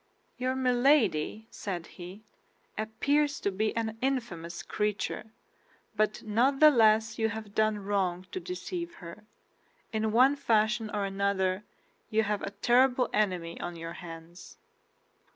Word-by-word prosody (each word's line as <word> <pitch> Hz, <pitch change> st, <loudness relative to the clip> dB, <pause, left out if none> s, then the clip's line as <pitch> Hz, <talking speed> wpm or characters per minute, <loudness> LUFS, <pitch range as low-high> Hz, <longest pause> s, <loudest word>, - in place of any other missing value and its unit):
"Your 255 Hz, +1 st, -1 dB
Milady," 245 Hz, -, +2 dB
said 180 Hz, -5 st, -5 dB
he, 185 Hz, +4 st, -11 dB, 0.5 s
"appears 285 Hz, +7 st, 0 dB
to 200 Hz, -, 0 dB
be 215 Hz, +4 st, -1 dB
an 225 Hz, -1 st, -2 dB
infamous 225 Hz, -11 st, -2 dB
creature, 210 Hz, -2 st, -2 dB, 0.7 s
but 215 Hz, 0 st, 0 dB
not 245 Hz, +6 st, +2 dB
the 305 Hz, 0 st, +9 dB
less 220 Hz, -3 st, +3 dB
you 220 Hz, 0 st, +2 dB
have 215 Hz, -1 st, -7 dB
done 215 Hz, 0 st, +2 dB
wrong 195 Hz, -3 st, -1 dB
to -, -, -3 dB
deceive 355 Hz, -1 st, -5 dB
her. 175 Hz, +4 st, -11 dB, 0.7 s
In 220 Hz, 0 st, 0 dB
one 255 Hz, +5 st, +5 dB
fashion 225 Hz, -4 st, +1 dB
or 205 Hz, -1 st, -1 dB
another 195 Hz, 0 st, 0 dB, 0.4 s
you 220 Hz, 0 st, +2 dB
have 210 Hz, -1 st, -1 dB
a -, -, -3 dB, 0.2 s
terrible 250 Hz, +1 st, +4 dB
enemy 180 Hz, -5 st, 0 dB
on 175 Hz, 0 st, -5 dB
your 165 Hz, 0 st, -6 dB
hands." 165 Hz, 0 st, -11 dB
215 Hz, 135 wpm, -29 LUFS, 195-245 Hz, 0.7 s, the